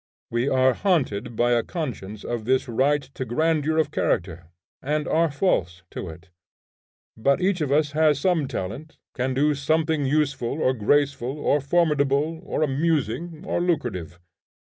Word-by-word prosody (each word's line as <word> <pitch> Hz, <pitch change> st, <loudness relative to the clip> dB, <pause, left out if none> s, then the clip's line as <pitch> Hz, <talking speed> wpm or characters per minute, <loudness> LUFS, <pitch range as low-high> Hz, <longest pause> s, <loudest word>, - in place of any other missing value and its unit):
We 120 Hz, +4 st, 0 dB
are 130 Hz, -1 st, +3 dB
haunted 125 Hz, -, 0 dB
by 120 Hz, +2 st, +2 dB
a 120 Hz, -1 st, +3 dB
conscience 110 Hz, -, -5 dB
of 120 Hz, -2 st, -4 dB
this 130 Hz, +2 st, +1 dB
right 140 Hz, +5 st, +1 dB
to -, -, -4 dB
grandeur 155 Hz, +5 st, 0 dB
of 155 Hz, -2 st, +1 dB
character, 85 Hz, -, -1 dB, 0.3 s
and 150 Hz, +2 st, -1 dB
are 165 Hz, 0 st, +2 dB
false 95 Hz, -, 0 dB
to 90 Hz, -, -6 dB
it. 80 Hz, +1 st, -13 dB, 0.8 s
But 140 Hz, +6 st, +2 dB
each 185 Hz, -1 st, +1 dB
of 145 Hz, -3 st, -1 dB
us 150 Hz, 0 st, +2 dB
has 150 Hz, -1 st, +3 dB
some 165 Hz, -3 st, +1 dB
talent, 130 Hz, -, -6 dB, 0.2 s
can 130 Hz, +1 st, -2 dB
do 150 Hz, +3 st, +3 dB
somewhat 155 Hz, +2 st, 0 dB
useful, 140 Hz, -2 st, 0 dB
or 130 Hz, -, +2 dB
graceful, 135 Hz, +2 st, +1 dB
or 145 Hz, 0 st, +1 dB
formidable, 150 Hz, 0 st, +1 dB
or -, -, -1 dB
amusing, 155 Hz, +2 st, -1 dB
or -, -, -1 dB
lucrative. 115 Hz, -, -2 dB
140 Hz, 150 wpm, -24 LUFS, 120-155 Hz, 0.8 s, are